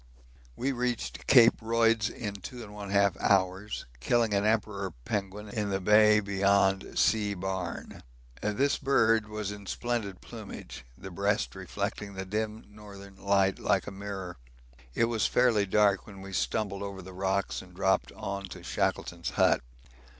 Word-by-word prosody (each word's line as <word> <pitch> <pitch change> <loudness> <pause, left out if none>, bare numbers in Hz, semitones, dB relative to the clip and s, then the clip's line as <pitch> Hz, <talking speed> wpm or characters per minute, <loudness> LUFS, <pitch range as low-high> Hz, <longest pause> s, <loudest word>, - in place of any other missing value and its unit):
We 135 +2 -1
reached 125 -2 -3
Cape 120 -4 +7
Royds 115 -1 +2
in 105 -4 -5
2 120 +4 -8
1/2 100 -2 0
hours, 95 +1 +1
killing 115 - +2
an 100 0 +2
Emperor 105 -3 0 0.2
penguin 105 0 -3
in 105 -1 -2
the 95 -1 0
bay 105 +2 +6
beyond 100 -1 +1
C. 105 -2 +2
Barne. 95 -2 -4 0.4
This 130 +7 +1
bird 115 -5 +3
was 105 -2 -4
in 100 -1 -9
splendid 115 -6 -2
plumage, 110 - -9
the - - -9
breast - - 0
reflecting 100 -1 -4
the 95 0 -4
dim 110 +2 -3
northern 100 -2 -12
light 95 -1 +2
like - - +1
a - - -6
mirror. 95 -2 -6 0.6
It 115 - +3
was 115 -2 +1
fairly 115 -5 +3
dark 100 -1 +3
when 100 -2 -11
we 95 0 -9
stumbled 100 +1 -1
over 100 -2 -6
the 95 +1 -10
rocks 95 +1 -1
and 90 -1 -15
dropped 95 +1 +1
on 100 0 -4
to 95 - -10
Shackleton's - - -1
Hut. - - +3
100 Hz, 150 wpm, -29 LUFS, 95-110 Hz, 0.6 s, Cape